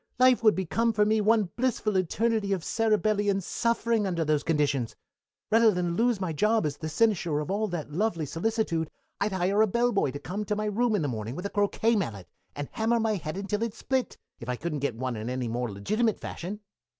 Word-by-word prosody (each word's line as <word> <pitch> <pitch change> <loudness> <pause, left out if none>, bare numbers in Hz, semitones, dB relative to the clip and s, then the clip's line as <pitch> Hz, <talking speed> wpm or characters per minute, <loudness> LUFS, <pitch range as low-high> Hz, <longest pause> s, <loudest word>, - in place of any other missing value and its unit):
Life 255 -1 +5
would 215 -2 +5
become 225 +6 0
for 210 0 +3
me 215 +1 +2
one 215 -3 +3
blissful 235 -4 0
eternity 200 +3 +1
of 185 -4 -2
cerebellian 215 -2 +1
suffering 230 +2 0
under 170 -3 -1
those 150 -1 +2
conditions. 145 -6 0 0.6
Rather 225 +1 +6
that 180 -3 0
lose 215 +6 +1
my 185 -4 -2
job 210 +4 +2
as 145 -1 -2
the 160 - -5
cynosure 175 -4 +1
of 150 +5 -3
all 215 +2 0
that 170 -6 -5
lovely 170 -2 0
solicitude 165 - -1 0.3
I'd 205 +1 0
hire 190 +3 +2
a 220 - +5
bellboy 235 - +1
to 135 - -5
come 195 +8 -4
to 210 - -1
my 215 +1 -2
room 220 +2 +1
in 185 - 0
the - - 0
morning 115 -1 -4
with 180 - -6
a 200 - -3
croquet 220 +3 +2
mallet 105 - -3 0.3
and 145 0 -4
hammer 230 +1 +1
my 220 -1 +1
head 160 -3 -4
until 205 +2 -2
it 230 -2 -2
split, 260 -1 -2 0.2
if 120 - -8
I 125 - 0
couldn't 155 +2 -3
get 140 -4 -1
one 125 +1 -3
in 110 +2 -4
any 125 -1 -2
more 120 0 -2
legitimate 215 - 0
fashion. 200 +5 -6
200 Hz, 210 wpm, -28 LUFS, 155-220 Hz, 0.6 s, Rather